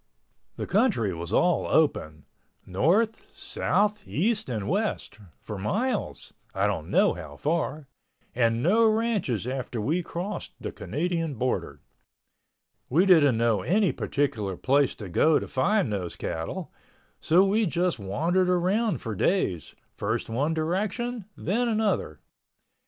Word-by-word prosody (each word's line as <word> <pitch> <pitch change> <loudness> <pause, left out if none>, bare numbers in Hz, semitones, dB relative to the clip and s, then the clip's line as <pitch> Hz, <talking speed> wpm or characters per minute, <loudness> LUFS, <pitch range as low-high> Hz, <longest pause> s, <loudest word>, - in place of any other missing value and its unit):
The - - -4
country 190 - +1
was 85 +1 -6
all 175 +9 +2
open—north, 155 - 0
south, 210 0 0
east 215 - 0
and 110 -5 -3
west—for 105 - -4
miles 215 - -2 0.2
(I - - +1
don't - - -2
know - - +4
how 80 -4 -9
far) 155 - -2 0.5
and 115 -1 +1
no 220 +6 +4
ranches 215 - 0
after 125 -2 -4
we 155 +12 0
crossed 175 +4 -5
the - - -5
Canadian 165 -1 -2
border. 125 +2 -2 1.1
We 165 +9 +4
didn't 150 - +5
know 115 -4 +2
any 195 - +2
particular 110 -10 -2
place 140 +1 +2
to 105 - -8
go 150 - +3
to - - -4
find 180 - +1
those 90 -4 -4
cattle, 80 0 -5 0.5
so 175 +4 +4
we 210 +2 +2
just 175 -4 0
wandered 165 - 0
around 190 +5 +1
for 115 - -4
days, 95 - 0 0.2
first 110 +2 -2
one 145 +8 0
direction, 205 +8 -2
then 235 +7 0
another. 210 - -1
160 Hz, 125 wpm, -26 LUFS, -, 1.1 s, didn't